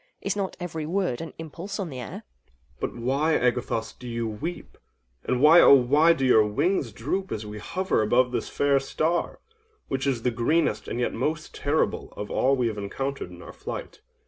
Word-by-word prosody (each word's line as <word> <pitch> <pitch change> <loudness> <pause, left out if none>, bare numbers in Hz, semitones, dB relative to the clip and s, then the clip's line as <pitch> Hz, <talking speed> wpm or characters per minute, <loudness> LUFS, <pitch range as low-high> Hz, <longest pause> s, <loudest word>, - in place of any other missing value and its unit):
Is - - -2
not 195 -2 -3
every 160 -3 -4
word 180 -8 -1
an 165 - -6
impulse 165 +6 -7
on 190 -4 -3
the 130 - -6
air? 125 - -7
OINOS. 60 +3 -38
But - - -3
why, 135 +7 +1
Agathos, 120 -2 0
do 125 - -11
you 115 -1 -2
weep—and 105 - -6
why, 155 +5 +8
oh - - +9
why 145 +6 +5
do 135 -4 -1
your 110 -4 +6
wings 120 - 0
droop 170 - -3
as 110 0 -3
we 105 0 -7
hover 185 - 0
above 125 +4 +3
this 125 - -2
fair 140 -1 +2
star—which 175 - -3
is 125 -4 0
the 125 - +2
greenest 120 +9 +1
and 120 - -3
yet 125 - 0
most 155 +6 -2
terrible 145 +2 -1
of 105 - -5
all 135 +2 +3
we 125 -3 +1
have 105 -2 -3
encountered 135 +4 -4
in 90 -1 -12
our - - -10
flight? - - -7
135 Hz, 190 wpm, -26 LUFS, 115-160 Hz, -, oh